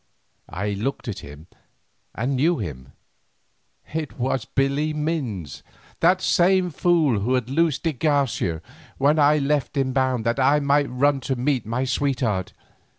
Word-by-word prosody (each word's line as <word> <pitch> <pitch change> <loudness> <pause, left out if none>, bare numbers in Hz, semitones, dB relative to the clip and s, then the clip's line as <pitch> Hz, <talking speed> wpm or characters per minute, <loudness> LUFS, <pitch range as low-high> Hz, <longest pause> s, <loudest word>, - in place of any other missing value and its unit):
I 100 +4 -3
looked 110 +7 -3
at 105 - -4
him 75 +2 -11 0.7
and 125 +4 -1
knew 160 +7 +2
him; 70 - -7 1.0
it 155 -3 -4
was 130 -1 -1
Billy 140 +3 0
Minns, 125 - -3 0.4
that 180 +2 +3
same 185 0 +3
fool 155 - +2
who 120 +6 0
had 125 0 -2
loosed 160 0 +1
de 165 -2 0
Garcia 130 - 0 0.3
when 145 +3 +3
I 150 +1 +5
left 140 -1 -1
him 130 -1 0
bound 130 -3 0
that 115 +3 0
I 140 +3 +4
might 140 0 +2
run 135 +3 +2
to 130 +1 -2
meet 125 -2 -1
my 120 +4 -1
sweetheart. 125 -7 -1
135 Hz, 150 wpm, -23 LUFS, 115-150 Hz, 1.0 s, I